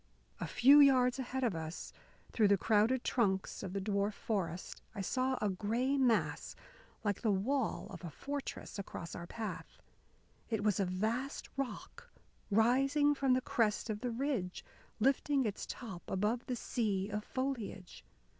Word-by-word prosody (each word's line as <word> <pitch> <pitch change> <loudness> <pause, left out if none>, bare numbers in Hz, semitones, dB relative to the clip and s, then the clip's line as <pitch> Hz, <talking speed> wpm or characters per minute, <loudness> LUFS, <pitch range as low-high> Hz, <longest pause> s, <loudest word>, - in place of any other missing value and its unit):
A - - -3
few 275 +4 +7
yards 260 -2 +5
ahead 265 +1 -3
of 235 -5 +2
us, 160 +1 -6 0.4
through 215 -3 +4
the 200 0 +5
crowded 225 +5 +3
trunks 190 -6 0
of 190 - -5
the 195 - -2
dwarf 200 +1 0
forest, 180 -5 -3
I 200 - -3
saw 255 +6 0
a 210 - +1
gray 230 +8 0
mass, 255 -5 +1 0.5
like 205 -3 -1
the 225 - +1
wall 235 +6 0
of 185 -1 -9
a 170 - -4
fortress, 280 - -5
across 170 -3 -6
our 170 - -6
path. 220 +2 -6 0.7
It 220 -3 -1
was 210 -3 +2
a 195 - +2
vast 220 +9 -2
rock, 275 - -5 0.4
rising 270 +7 +4
from 270 -2 +2
the 255 - +1
crest 220 -2 0
of 210 - -4
the 245 - -2
ridge, 235 -7 -2 0.3
lifting 270 +2 +2
its 210 -2 -3
top 195 -8 -7
above 210 +5 0
the 250 - -1
sea 210 -5 -1
of 210 0 -3
foliage. 245 -9 -4
225 Hz, 155 wpm, -34 LUFS, 200-260 Hz, 0.7 s, few